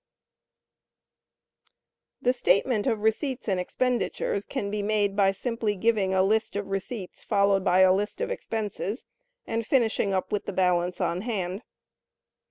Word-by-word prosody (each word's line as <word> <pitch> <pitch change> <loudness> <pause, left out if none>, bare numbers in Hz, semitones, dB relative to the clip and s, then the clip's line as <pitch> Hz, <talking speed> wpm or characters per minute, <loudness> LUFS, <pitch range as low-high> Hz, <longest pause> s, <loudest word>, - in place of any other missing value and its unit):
S. - - -53 0.5
The 250 - +4
"Statement 220 0 +2
of 220 -4 0
receipts 250 +4 0
and 190 -3 +1
expenditures" 235 0 -1
can 205 -7 -3
be 210 0 -1
made, 205 -1 +1
by 195 -1 +4
simply 220 +1 -2
giving 205 -1 +1
a 190 0 +3
list 220 +2 +1
of 205 -1 -3
receipts, 195 0 -5
followed 200 -2 +2
by 180 +1 +4
a 185 0 +7
list 205 +2 -2
of 485 0 -2
expenses, 220 - -4 0.4
and 230 0 -2
finishing 225 -4 +1
up 190 -1 -1
with 205 - -1
the 200 - -4
balance 180 -1 +1
on 175 -1 0
hand. 195 -4 -3
205 Hz, 150 wpm, -27 LUFS, 190-225 Hz, 0.5 s, a